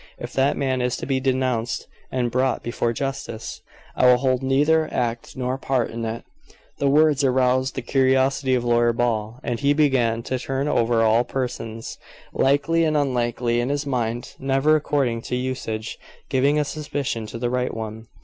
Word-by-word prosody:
If - - -7
that 135 +1 +2
man 130 -2 0
is 125 0 0
to - - -5
be 135 -1 0
denounced 130 -3 -1 0.3
and 125 -2 -1
brought 130 +2 0
before 120 0 -1
justice, 115 -3 -5 0.3
I 125 - +4
will 125 0 +7
hold 130 0 +1
neither 150 +4 +2
act 120 0 -3
nor 130 +1 -2
part 130 -3 0
in 115 0 -5
it." 115 +1 -4 0.6
The 140 - +2
words 150 0 +4
aroused 130 0 +2
the 130 - -4
curiosity 130 +1 +2
of 120 - 0
Lawyer 120 0 +3
Ball, 115 -1 -1
and 120 -1 -2
he 140 +1 +3
began 125 -6 +2
to 130 +1 -2
turn 135 +2 -2
over 115 -4 +2
all 115 +2 +4
persons, 115 -4 -5 0.3
likely 155 +5 +2
and 155 -1 +2
unlikely, 120 -3 0
in 120 - -2
his 145 +1 -1
mind, 120 -3 -2
never, 135 +3 +3
according 140 -6 0
to - - 0
usage, 125 -3 -4 0.3
giving 140 +3 +2
a 150 - +2
suspicion 140 -7 -3
to 115 - -7
the 120 +1 -2
right 125 0 0
one. 110 0 -6
130 Hz, 175 wpm, -23 LUFS, 120-135 Hz, 0.6 s, will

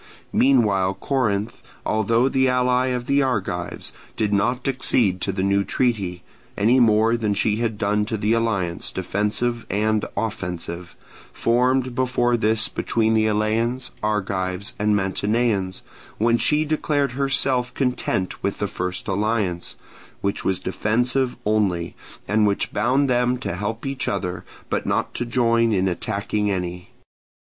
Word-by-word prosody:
Meanwhile 105 -8 +3
Corinth, 110 -6 -1 0.2
although 115 +3 +2
the 130 -1 +2
ally 125 0 +2
of 125 -1 -2
the 140 +2 +3
Argives, 100 -9 -2 0.2
did 105 -1 0
not 120 +6 +1
accede 120 -8 +1
to 95 - -1
the 95 0 -2
new 100 0 +2
treaty, 100 -8 -1 0.3
any 115 +6 +4
more 110 -1 +4
than 110 -3 0
she 105 +1 +1
had 115 -2 -1
done 105 0 +1
to 110 +1 -2
the 105 +2 +1
alliance, 100 -7 -1
defensive 105 +5 -1
and 110 +1 +1
offensive, 90 -5 -4 0.4
formed 125 +2 +1
before 125 -1 +1
this 110 -1 +2
between 110 -1 0
the 110 0 +3
Eleans, 110 +4 0
Argives, 100 -2 -2
and 105 0 +2
Mantineans, 100 0 0 0.3
when 115 +2 +3
she 150 +1 +2
declared 145 -3 0
herself 135 -1 +1
content 125 -8 -1
with 100 - -1
the 100 - -1
first 90 +3 -4
alliance, 100 -3 -1 0.5
which 100 0 -1
was 95 -2 0
defensive 125 +6 0
only, 100 -6 0 0.3
and 105 +1 +3
which 100 - -1
bound 130 +6 +2
them 125 0 +2
to 120 -8 -4
help 110 +6 -4
each 135 -1 -3
other, 90 -2 -2 0.2
but - - -2
not - - 0
to 120 - -3
join 115 -1 +2
in 95 -2 +2
attacking 100 +3 -1
any. 90 -2 -3
110 Hz, 140 wpm, -23 LUFS, 100-125 Hz, 0.5 s, any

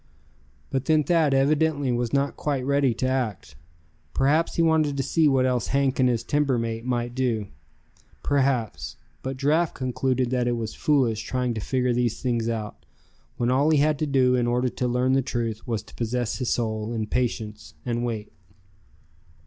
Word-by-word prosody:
But 135 -1 -1
then 155 -1 +3
Thad 165 -3 +3
evidently 145 0 +2
was 120 -1 -1
not 140 0 +1
quite 140 -4 -2
ready 140 -1 +2
to 130 - -1
act. 110 - -2 0.6
Perhaps 150 +5 +2
he 165 - +3
wanted 155 -3 +2
to 135 - 0
see 160 +3 +2
what 135 -2 +3
else 125 -3 0
Hank 135 -1 +1
and 130 -1 +4
his 115 -2 0
timber 145 -1 +1
mate 115 -1 -3
might 120 -1 -2
do. 120 -5 -1 0.7
Perhaps 135 -5 0 0.2
but 130 0 -4
Giraffe 155 +5 +1
concluded 130 -1 -1
that 125 -1 +1
it 120 - +1
was 110 -2 -4
foolish 130 -9 +1
trying 125 -1 -1
to 110 - -4
figure 125 +2 0
these 120 -2 0
things 120 -3 -1
out, 110 -2 -5 0.5
when 120 -1 +1
all 140 +4 +3
he 155 - +4
had 150 0 +2
to 155 - 0
do 130 -2 +3
in 120 -1 +2
order 125 +1 +1
to 125 - -2
learn 125 +2 +1
the 135 - +3
truth, 115 -2 -3
was 115 -3 -2
to - - -17
possess 120 +1 -2
his 125 - -1
soul 110 -1 -1
in 110 -2 -2
patience 105 - -3
and 120 0 -1
wait. 110 -3 -4
125 Hz, 180 wpm, -25 LUFS, 120-140 Hz, 0.7 s, and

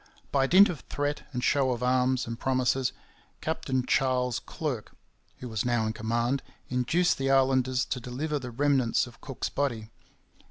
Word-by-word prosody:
By 135 -1 +3
dint 195 +6 +8
of 165 - -4
threat 145 +1 -2
and 125 -2 -3
show 140 -2 +3
of 125 -1 -2
arms 125 0 +2
and 115 0 -6
promises, 130 0 +1 0.5
Captain 130 -5 -1
Charles 125 -2 +1
Clerke, 135 -9 -5 0.4
who 125 - -7
was 110 -4 -2
now 120 -2 +1
in 110 - -1
command, 120 +4 0 0.3
induced 130 +9 +1
the 135 0 0
islanders 130 -2 +3
to 130 - -3
deliver 140 +5 -3
the 130 -2 -6
remnants 135 -1 +2
of 120 - -15
Cook's 135 -4 -4
body. 115 -6 -2
130 Hz, 160 wpm, -28 LUFS, 120-140 Hz, 0.5 s, dint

